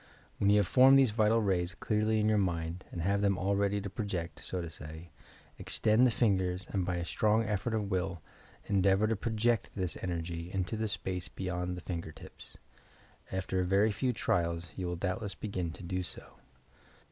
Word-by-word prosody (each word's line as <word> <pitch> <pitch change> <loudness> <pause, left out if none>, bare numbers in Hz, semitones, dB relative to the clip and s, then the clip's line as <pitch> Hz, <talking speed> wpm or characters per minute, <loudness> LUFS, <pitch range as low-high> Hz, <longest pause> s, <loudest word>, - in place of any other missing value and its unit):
When 100 - +3
you 105 - +6
have 105 - +4
formed 130 +5 +7
these 135 -5 +5
vital 110 +1 +3
raya 90 -2 0
clearly 110 0 +1
in 105 - +2
your 110 -1 +3
mind 85 -1 -2
and 85 - -4
have 100 +2 +1
them 100 -2 +2
all 100 +2 +1
ready 100 0 +1
to 100 - -5
project, 95 -6 -4
so 95 - -3
to 85 - -4
say, 80 +1 -9 0.5
extend 115 +3 +3
the - - +3
fingers 95 -5 +1
and 95 -3 0
by 90 0 -1
a 85 -1 -2
strong 110 +4 +2
effort 110 +1 -1
of 105 -2 -2
will, 95 -1 -1 0.5
endeavour 100 +1 +3
to 110 +1 +1
project 115 +2 0
this 90 -3 -2
energy, 85 -1 -4
into 105 +4 -1
space, 95 -3 -3
beyond 90 -1 -3
the - - -7
finger 85 -2 -5
tips. - - -13 0.7
After 95 0 -1
a - - +2
very 100 +4 +3
few 125 +6 0
trials, 85 -6 -1
you 90 -2 -3
will 90 - -2
doubtless 95 +3 -3
begin 95 -5 -3
to 90 - -10
do 90 +1 -2
so. 90 - -8
95 Hz, 190 wpm, -31 LUFS, 90-105 Hz, 0.7 s, formed